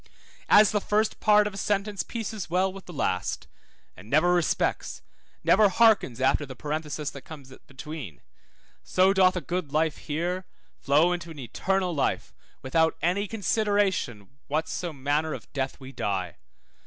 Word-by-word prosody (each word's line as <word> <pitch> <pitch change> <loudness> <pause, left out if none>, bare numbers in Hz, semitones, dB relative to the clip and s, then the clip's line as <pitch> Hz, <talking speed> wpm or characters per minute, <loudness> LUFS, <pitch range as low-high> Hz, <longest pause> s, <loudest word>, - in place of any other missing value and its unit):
As 210 0 +7
the 210 - 0
first 215 +2 0
part 210 0 +5
of 210 - -3
a - - -8
sentence 205 0 -1
pieces 220 -5 -5
well 185 +2 +1
with 195 -1 -11
the - - -8
last, 90 - -2 0.5
and 95 +5 -14
never 155 +6 +4
respects, 175 -2 0 0.4
never 205 +1 +5
hearkens 200 - +3
after 130 +3 +2
the 130 -2 -8
parenthesis 150 +1 -4
that 140 - -10
comes 140 -4 -12
between, 140 - -8 0.6
so 185 +1 +3
doth 185 -1 +4
a 180 - -2
good 165 0 -3
life 155 +1 +1
here 175 +4 -3 0.3
flow 155 +6 +3
into 170 -1 -5
an 160 - -10
eternal 180 - -1
life, 145 - -1 0.3
without 160 +5 +2
any 190 +5 +1
consideration 195 - -1
what 155 +2 -1
so 175 -2 -4
manner 145 +2 -1
of - - -13
death 135 -1 -3
we 130 -1 -10
die. 95 - -3
165 Hz, 155 wpm, -26 LUFS, 140-195 Hz, 0.6 s, As